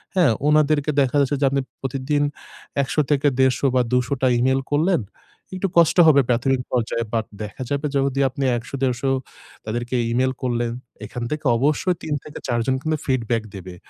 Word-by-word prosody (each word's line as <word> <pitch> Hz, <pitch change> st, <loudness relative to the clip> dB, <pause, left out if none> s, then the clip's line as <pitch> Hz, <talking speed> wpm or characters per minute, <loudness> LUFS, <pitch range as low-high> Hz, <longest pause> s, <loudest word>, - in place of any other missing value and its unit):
হ্যাঁ 175 Hz, -8 st, +4 dB, 0.2 s
ওনাদেরকে 150 Hz, 0 st, +3 dB
দেখা 135 Hz, 0 st, 0 dB
যাচ্ছে 140 Hz, +1 st, 0 dB
যে, -, -, +4 dB
আপনি 140 Hz, 0 st, +1 dB, 0.2 s
প্রতিদিন 135 Hz, +2 st, -1 dB, 0.6 s
১০০ 145 Hz, +3 st, 0 dB
থেকে 145 Hz, 0 st, +3 dB
১৫০ 130 Hz, 0 st, +2 dB
বা 125 Hz, -, +4 dB
২০০ 125 Hz, +2 st, +1 dB
টা 130 Hz, -, +3 dB
e-mail 130 Hz, +2 st, +2 dB
করলেন। 160 Hz, +3 st, +2 dB, 0.5 s
একটু 185 Hz, +1 st, -1 dB
কষ্ট 170 Hz, 0 st, +5 dB
হবে 140 Hz, -3 st, +6 dB
প্রাথমিক 125 Hz, +2 st, +1 dB
পর্যায়ে। 115 Hz, -1 st, -1 dB
বাট 110 Hz, -2 st, 0 dB, 0.2 s
দেখা 105 Hz, +5 st, -8 dB
যাবে 145 Hz, +1 st, -1 dB
যদি 140 Hz, 0 st, +1 dB
আপনি 140 Hz, +2 st, -4 dB
১০০-১৫০ 130 Hz, +1 st, -2 dB, 0.6 s
তাদেরকে 120 Hz, +3 st, -3 dB, 0.2 s
e-mail 130 Hz, +2 st, +2 dB
করলেন, 120 Hz, -2 st, 0 dB, 0.3 s
এখান 120 Hz, +3 st, -6 dB
থেকে 150 Hz, 0 st, -4 dB
অবশ্যই 150 Hz, +7 st, +1 dB
৩ 155 Hz, -, -2 dB
থেকে 150 Hz, -, -9 dB
৪ 120 Hz, -1 st, 0 dB
জন 130 Hz, -, +1 dB
কিন্তু 155 Hz, +1 st, -1 dB
ফিডব্যাক 120 Hz, -3 st, 0 dB
দেবে। 95 Hz, -1 st, -8 dB
135 Hz, 170 wpm, -22 LUFS, 120-145 Hz, 0.6 s, হবে